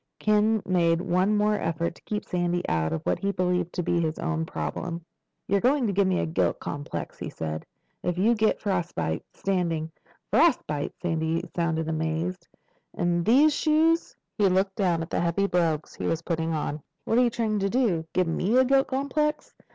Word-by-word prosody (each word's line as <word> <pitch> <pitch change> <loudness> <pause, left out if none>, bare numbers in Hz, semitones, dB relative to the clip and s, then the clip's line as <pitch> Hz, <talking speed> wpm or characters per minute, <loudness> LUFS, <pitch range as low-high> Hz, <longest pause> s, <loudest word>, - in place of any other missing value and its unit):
Ken 215 0 +2
made 170 -2 +2
one 185 +4 +1
more 210 0 +2
effort 165 0 -1
to - - -20
keep 210 -1 -4
Sandy 175 -1 -1
out 80 -1 0
of 80 -1 -3
what 90 - 0
he 200 - 0
believed 180 -2 0
to 180 - -2
be 170 +1 +1
his 160 -1 -1
own 160 -1 -2
problem. 170 0 -4 0.4
"You're 200 0 +2
going 265 +1 +3
to 205 - 0
give 195 0 +3
me 185 -1 +1
a - - 0
guilt 160 - 0
complex," 145 0 -5
he - - -4
said. 80 -1 -5 0.3
"If 175 -1 -2
you 215 +6 +4
get 220 -1 +1
frostbite, 175 - -2
standing—" 170 -4 -1 0.4
"Frostbite?" 220 - +2
Sandy 165 0 -1
sounded 160 -2 0
amazed. 160 +3 -2 0.5
"In 175 0 +1
these 280 - +5
shoes?" 320 +2 +2 0.2
He 200 -2 +5
looked 190 +1 +1
down 175 -5 +1
at 165 - -9
the - - 0
heavy 175 +3 +1
brogues 165 -5 0
he - - -4
was 165 0 -1
putting 165 -1 -1
on. 150 -1 -2 0.2
"What 230 - +2
are - - +5
you 245 - +3
trying 225 -3 -1
to 195 0 0
do? 195 -10 +1
Give 185 - +2
me 185 +8 +1
a 260 - +6
guilt 270 +1 +3
complex? 300 +3 -1
180 Hz, 190 wpm, -26 LUFS, 165-210 Hz, 0.5 s, a